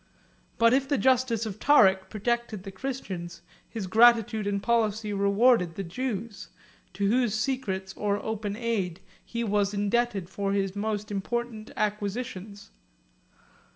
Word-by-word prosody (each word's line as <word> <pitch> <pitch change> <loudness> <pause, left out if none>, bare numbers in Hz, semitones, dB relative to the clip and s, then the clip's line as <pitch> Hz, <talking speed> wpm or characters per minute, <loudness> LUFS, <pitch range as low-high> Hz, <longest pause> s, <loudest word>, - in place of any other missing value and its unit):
But 230 +1 +5
if 270 +1 +1
the 285 - +2
justice 255 -4 +2
of 215 -1 -6
Tarik 190 -10 +5
protected 230 -1 -2
the 195 - -7
Christians, 190 -7 -6 0.3
his 220 -4 -5
gratitude 220 +1 +4
and 200 0 0
policy 220 -2 +1
rewarded 200 -2 +3
the 195 - -4
Jews, 215 +1 -5 0.5
to 200 +2 0
whose 235 0 +2
secret 215 -6 -2
or 205 -1 0
open 215 -2 -3
aid 205 -6 -2 0.2
he 235 0 -4
was 205 -1 0
indebted 205 -2 0
for 195 +2 -2
his 195 -1 -1
most 210 0 -3
important 220 +2 -3
acquisitions. 205 -1 -3
210 Hz, 130 wpm, -27 LUFS, 195-235 Hz, 0.5 s, But